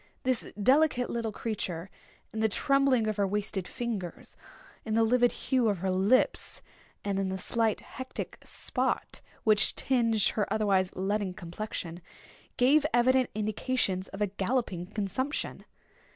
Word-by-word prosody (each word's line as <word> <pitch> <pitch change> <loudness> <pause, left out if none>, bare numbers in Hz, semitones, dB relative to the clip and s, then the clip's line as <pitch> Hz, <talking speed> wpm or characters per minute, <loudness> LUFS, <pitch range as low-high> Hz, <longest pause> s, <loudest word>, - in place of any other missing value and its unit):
This 255 -2 -1
delicate 260 +2 +3
little 230 -2 -2
creature, 195 -5 -4 0.4
in 220 - -3
the 220 0 +3
trembling 275 0 +3
of 215 -1 -1
her 200 -1 +2
wasted 200 -2 -2
fingers, 210 -8 -5 0.5
in 220 -1 -2
the 225 - +4
livid 245 +1 +4
hue 255 -4 +1
of 200 - 0
her 190 +2 -1
lips, 195 +8 +1 0.4
and 200 -1 0
in 195 -1 0
the 190 - -2
slight 225 +3 0
hectic 260 0 -7
spot - - -2 0.2
which 210 -2 +4
tinged 230 -5 +2
her 210 - -1
otherwise 195 -4 +2
leaden 195 0 -1
complexion, 175 -1 -6 0.6
gave 275 +4 +5
evident 255 +1 +4
indications 215 -2 -1
of 195 - -9
a - - +1
galloping 195 -2 -2
consumption. 210 +8 -3
215 Hz, 135 wpm, -29 LUFS, 195-245 Hz, 0.6 s, gave